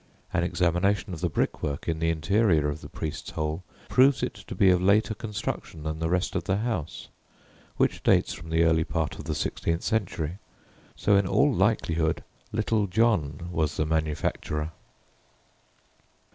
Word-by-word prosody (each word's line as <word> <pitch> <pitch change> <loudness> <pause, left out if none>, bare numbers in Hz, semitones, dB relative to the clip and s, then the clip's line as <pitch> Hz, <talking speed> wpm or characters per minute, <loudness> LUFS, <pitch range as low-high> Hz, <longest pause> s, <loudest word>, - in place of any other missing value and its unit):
An - - +2
examination 90 +3 +1
of 80 - -7
the - - +1
brick - - -1
work 70 0 -3
in 80 -1 -1
the 80 0 +1
interior 80 0 +2
of 75 +1 -5
the - - -9
"priest's 75 - -5
hole" 80 +3 -3 0.2
proves 135 +1 +4
it - - -1
to 100 -4 -9
be 95 0 +5
of 90 -1 +3
later 105 +3 +3
construction 105 -7 -5
than 80 0 -3
the 80 0 -1
rest 90 +2 0
of 90 -3 -1
the 95 +2 +1
house 110 -9 -3 0.7
(which - - +1
dates - - +3
from 80 0 -10
the 80 +1 +3
early 80 -1 +3
part - - -2
of - - -7
the 80 -1 -2
sixteenth 85 +2 -1
century), 95 -6 -1 0.6
so 100 - +3
in 100 -1 +3
all 140 +8 +3
likelihood 85 -6 +1 0.3
"Little 110 -1 +1
John" 90 -7 +1
was 80 -3 -1
the 80 - +1
manufacturer. 75 0 -1
85 Hz, 165 wpm, -27 LUFS, 80-100 Hz, 0.7 s, be